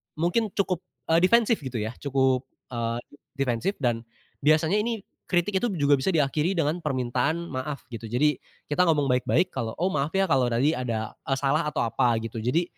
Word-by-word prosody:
mungkin 175 +8 +1
cukup, 185 -4 0 0.3
eee, 165 - +6
defensif 230 +4 +4
gitu 130 -4 -7
ya 110 -1 -2
cukup, 130 -2 +1 0.2
eee, 115 0 -2 0.3
defensif 135 - 0
dan, 120 -2 +2 0.4
biasanya 155 +6 +3
ini 225 -2 -2 0.2
kritik 190 +2 +1
itu 240 - 0
juga 145 -3 +3
bisa 130 - -3
diakhiri 155 +3 +1
dengan 160 +1 0
permintaan 140 +3 -1
maaf 140 +1 -4
gitu. 115 -1 -6
Jadi, 130 +5 +1 0.3
kita 150 +5 +2
ngomong 145 -5 +2
baik-baik 125 +8 +2
kalau, 110 -1 -3
"Oh 180 +4 0
maaf 145 -1 -1
ya 195 - +4
kalau 130 -7 +3
tadi 120 +5 +2
ada, 115 -6 -2 0.2
eee, 135 - +2
salah 145 +3 +1
atau 150 - -1
apa 115 +1 +2
gitu," 115 0 -5
jadi, 125 +10 +1
145 Hz, 180 wpm, -26 LUFS, 125-170 Hz, 0.4 s, eee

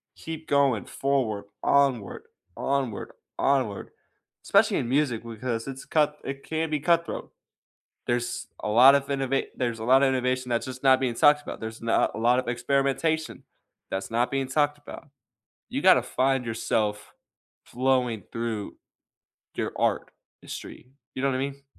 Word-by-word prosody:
keep 160 -1 -8
going 140 -6 +2
forward, 125 -7 -1 0.2
onward, 135 -8 +1 0.3
onward, 135 -6 -2 0.3
onward. 130 -7 0 0.5
Especially 200 +1 +3
in 120 - -2
music 130 -4 +1
because 115 +1 -4
it's 135 0 -7
cut 150 -1 +1
it 135 0 -5
can 160 0 -2
be 150 - 0
cutthroat. 170 +2 0 0.8
There's 120 0 -2
a - - -3
lot 125 +6 +8
of 140 -1 +1
innova 135 -1 -1
There's 120 -3 -2
a - - -5
lotta 135 +3 +5
innovation 130 -1 0
that's 120 -1 0
just 130 0 -7
not 130 -1 +6
being 130 -3 0
talked 145 +4 +5
about, - - -7
there's 110 0 -6
not 115 0 +1
a - - -6
lotta 120 +2 +2
experimentation 140 +5 0 0.5
that's 95 0 -3
not 120 +2 +1
being 135 -1 -1
talked 145 +2 +1
about. 145 - -11 0.6
You - - -2
gotta - - +6
find 135 -1 0
yourself 105 -2 -2 0.5
flowing 125 -4 0
through 115 -3 -4 0.8
your - - -3
art - - 0 0.3
history, 125 - -9 0.2
you 130 - -3
know 140 - +2
what 130 - -1
I - - -1
mean? 140 +1 -5
130 Hz, 150 wpm, -26 LUFS, 115-140 Hz, 0.8 s, lot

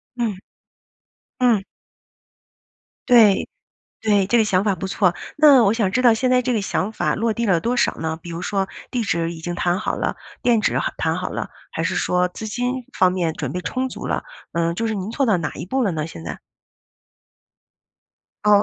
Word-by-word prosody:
嗯。 225 -6 -1 1.0
嗯。 235 -6 +3 1.4
对 225 -6 +6 0.5
对， 205 -3 +3
这 235 +4 +3
个 - - +5
想 190 -2 +2
法 205 -2 +2
不 185 +2 -4
错。 185 -2 +2 0.2
那 285 -5 +7
我 200 - +4
想 215 -5 0
知 255 - +1
道 240 -2 +6
现 250 +3 +1
在 250 - +4
这 250 0 0
个 215 - +1
想 195 +1 -1
法 - - 0
落 225 +1 0
地 235 +1 -1
了 180 -5 +3
多 240 +7 -1
少 - - +3
呢？ 160 0 -2
比 170 +1 -9
如 165 - -5
说 195 +1 -1 0.2
地 245 -2 -1
址 170 -4 -1
已 165 - -8
经 175 +1 -3
谈 175 +1 0
好 - - -2
了， - - -2 0.3
店 235 -3 +3
址 - - +1
好 - - -1
谈 - - 0
好 - - -3
了， - - -5 0.2
还 - - -3
是 - - -1
说 180 0 +1
资 220 +4 -7
金 245 +3 -2
方 185 -1 +5
面 175 -3 0
准 - - -4
备 180 - -3
充 255 +11 -2
足 - - -6
了？ - - -1 0.3
嗯 170 0 +1
就 230 +5 -2
是 220 - -1
您 195 +3 -4
做 275 0 0
到 215 - +4
到 - - +3
哪 150 -3 -3
一 175 - -7
步 260 +2 0
了 200 - +1
呢 155 -1 -3
现 85 - -10
在？ - - -6 2.1
哦。 205 -1 +6
205 Hz, 225 characters per minute, -21 LUFS, 180-235 Hz, 2.1 s, 那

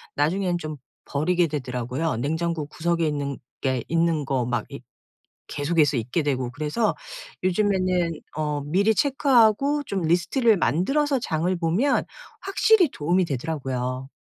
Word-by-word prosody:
나중에는 175 +4 +1
좀 155 -2 -6 0.3
버리게 170 +4 +1
되더라고요. 130 0 -3
냉장고 160 +4 -1
구석에 170 +1 -1
있는 140 -3 -2 0.2
게 130 -3 0
있는 165 -2 +1
거 130 -3 0
막 120 -2 -1
이 - - -8 0.7
계속해서 150 -1 +1
있게 125 +7 -1
되고 130 -4 -1
그래서 155 - -1 0.5
요즘에는 185 -2 +1 0.3
어 150 -1 -1
미리 200 +8 +2
체크하고 275 +1 +3
좀 200 -8 -3
리스트를 190 - +2
만들어서 275 - +1
장을 175 -4 -1
보면 180 - +1 0.4
확실히 390 -2 +3
도움이 175 +5 +1
되더라고요. 130 -3 -3
165 Hz, 310 characters per minute, -24 LUFS, 145-190 Hz, 0.7 s, 체크하고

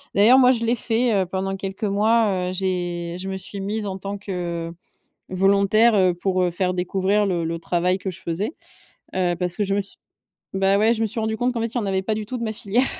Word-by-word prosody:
D'ailleurs, 225 +7 +7
moi 250 -1 +6
je 235 -2 +2
l'ai 235 +2 +2
fait, 230 +1 +1
heu, - - -5
pendant 190 +1 -2
quelques 195 +1 -6
mois, 205 -2 +2
heu - - -3
j'ai 175 -2 -2
je 190 +1 -5
me 190 - -3
suis 195 +2 -3
mise 210 +2 -2
en 190 -1 -4
tant 200 +1 -5
que 175 -4 -4 0.6
volontaire, 200 +4 +4
heu, 185 -3 +3
pour, 185 +1 0
heu, 180 - +2
faire 180 +1 -1
découvrir 190 +3 +1
le 175 -3 -1
le 165 +1 -3
travail 180 +2 0
que 190 - -5
je 180 - -9
faisais, 195 - -3 0.6
heu, 175 -2 +1
parce 180 -1 -1
que 210 - 0
je 195 0 0
me 205 - +1
suis 195 - -4 0.6
bah 195 +1 +3
ouais, 220 +2 +4
je 225 - -1
me - - +2
suis 225 +2 -1
rendu 220 0 -1
compte 250 +1 0
qu'en 230 - -2
fait, 230 +1 -3
il - - 0
y - - +1
en 210 - -3
avait 190 -1 0
pas 215 +3 -1
du 215 0 -4
tout 250 +3 -4
de 235 - -3
ma 220 - -2
filière 230 +3 0
195 Hz, 255 wpm, -22 LUFS, 185-220 Hz, 0.6 s, D'ailleurs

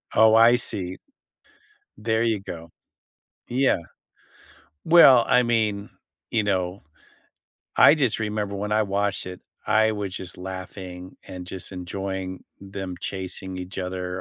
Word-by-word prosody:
Oh, 110 0 +6
I 115 +2 +7
see. 95 -6 -1 1.0
There 110 +1 0
you 115 -3 +1
go. 85 -3 -9 0.8
Yeah. 130 -4 +2 1.1
Well, 140 -8 +8
I 125 - +5
mean, 110 -4 0 0.4
you 110 -2 +1
know. 95 -1 -1 1.0
I - - +8
just 135 -9 +1
remember 105 -2 -2
when 105 +1 -4
I 110 +1 +3
watched 100 0 -1
it, 90 0 -8 0.3
I 110 0 +4
wa 105 -2 -3
just 95 -1 -6
laughing 95 0 -8
and 90 -1 -8
just 95 +1 -6
enjoying 95 0 -5 0.2
them 95 -2 -6
chasing 95 0 -4
each 90 +1 -7
other 90 -1 -4
100 Hz, 125 wpm, -24 LUFS, 95-110 Hz, 1.1 s, Well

